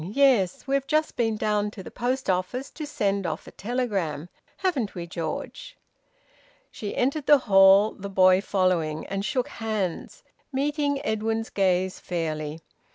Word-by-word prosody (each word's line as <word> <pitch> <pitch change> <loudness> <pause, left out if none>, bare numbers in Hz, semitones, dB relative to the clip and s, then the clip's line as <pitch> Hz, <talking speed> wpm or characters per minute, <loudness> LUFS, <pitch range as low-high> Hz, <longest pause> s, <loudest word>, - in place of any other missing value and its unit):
Yes. 210 - +2
We've 275 0 0
just 310 +2 +1
been 225 -3 0
down 210 -1 0
to 205 -2 -10
the - - -10
post 255 +2 -2
office 185 +9 -1
to 305 -2 -6
send 200 -9 -1
off 160 - -4
a - - -11
telegram, 195 - -2 0.3
haven't 285 - -1
we, 175 -1 -5
George?" 170 - -6 0.9
She 205 -2 -6
entered 275 +3 0
the 295 - +8
hall, 195 -2 +6
the 200 0 -8
boy 185 -1 +5
following, 180 -6 0
and 195 0 -3
shook 255 +1 -1
hands, 215 - -4 0.3
meeting 285 +1 -1
Edwin's 220 +1 -1
gaze 185 -1 +1
fairly. 155 -2 -3
205 Hz, 145 wpm, -26 LUFS, 185-260 Hz, 0.9 s, the